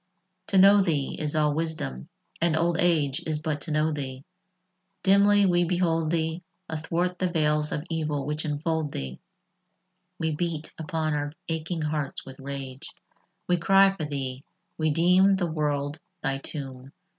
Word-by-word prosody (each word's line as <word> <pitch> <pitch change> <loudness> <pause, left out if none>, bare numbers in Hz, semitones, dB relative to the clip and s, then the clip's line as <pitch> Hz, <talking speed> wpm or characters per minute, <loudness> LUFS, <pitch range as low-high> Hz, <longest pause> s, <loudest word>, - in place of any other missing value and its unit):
II 185 0 -49
To 195 - +1
know 200 +2 +8
thee 155 -7 0
is 150 -1 -2
all 150 -1 +3
wisdom, 160 -1 -3 0.3
and 165 -2 +2
old 170 +1 +1
age 150 -6 +2
Is 155 -1 0
but 150 -1 -3
to 160 - -3
know 155 +1 +2
thee: 135 -3 -5 0.8
dimly 200 +1 +5
we 175 -1 +3
behold 165 -2 +1
thee 160 +1 -1 0.3
Athwart 170 +3 -2
the 185 - +1
veils 150 -2 +2
of 150 - -2
evil 155 -4 -2
which 150 +1 -2
enfold 155 0 -2
thee 65 -1 -5 1.0
We 160 -2 -1
beat 160 0 -2
upon 160 -1 -1
our 145 0 -2 0.2
aching 160 +1 -2
hearts 150 -2 -3
with 135 0 -11
rage; 135 -1 -6 0.6
We 180 - +3
cry 195 +2 +5
for 155 - -3
thee: 135 -2 -4 0.3
we 155 -1 +1
deem 180 +5 +5
the 175 -3 -1
world 145 -1 -1 0.2
thy 135 0 0
tomb. 135 -1 -7
155 Hz, 155 wpm, -26 LUFS, 145-175 Hz, 1.0 s, know